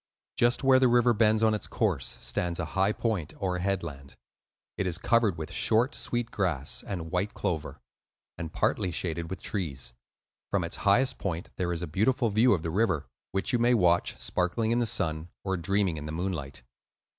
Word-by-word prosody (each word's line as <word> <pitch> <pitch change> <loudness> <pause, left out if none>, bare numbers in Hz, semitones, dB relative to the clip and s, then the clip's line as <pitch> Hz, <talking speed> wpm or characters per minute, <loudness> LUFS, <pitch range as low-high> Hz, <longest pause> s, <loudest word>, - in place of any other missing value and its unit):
Just 120 +2 +3
where 135 -1 +6
the 130 - +5
river 120 0 +4
bends 110 0 +3
on 110 -1 +4
its 105 - -3
course - - -1
stands 85 +8 -1
a - - -1
high 95 +2 +3
point 105 -9 -2
or 90 -2 -1
headland. 85 -8 -3 0.6
It 95 - -1
is 85 -2 -1
covered 110 -1 +2
with 80 -1 -6
short, 120 +5 +2
sweet 120 0 -2
grass 80 -9 -1
and 85 -4 -4
white 95 +3 -1
clover, 80 -4 -3 0.6
and 85 -2 -6
partly 95 +2 0
shaded 85 -1 -3
with 95 - -6
trees. 70 - -3 0.6
From 100 -3 +1
its 85 - -4
highest 130 +6 +3
point 85 -3 -4
there 90 -2 -1
is 85 0 -3
a - - -3
beautiful 115 - +1
view 110 +4 +5
of 85 -5 -1
the 80 - -2
river, 95 -6 +1 0.3
which 95 +7 -1
you 120 - +3
may 120 +1 +4
watch 90 -5 +2
sparkling 95 +5 0
in 120 - +2
the 120 - +2
sun 85 -7 0
or 95 -1 -1
dreaming 95 -1 0
in 75 0 -6
the - - -4
moonlight. 80 -7 -4
95 Hz, 190 wpm, -28 LUFS, 85-110 Hz, 0.6 s, where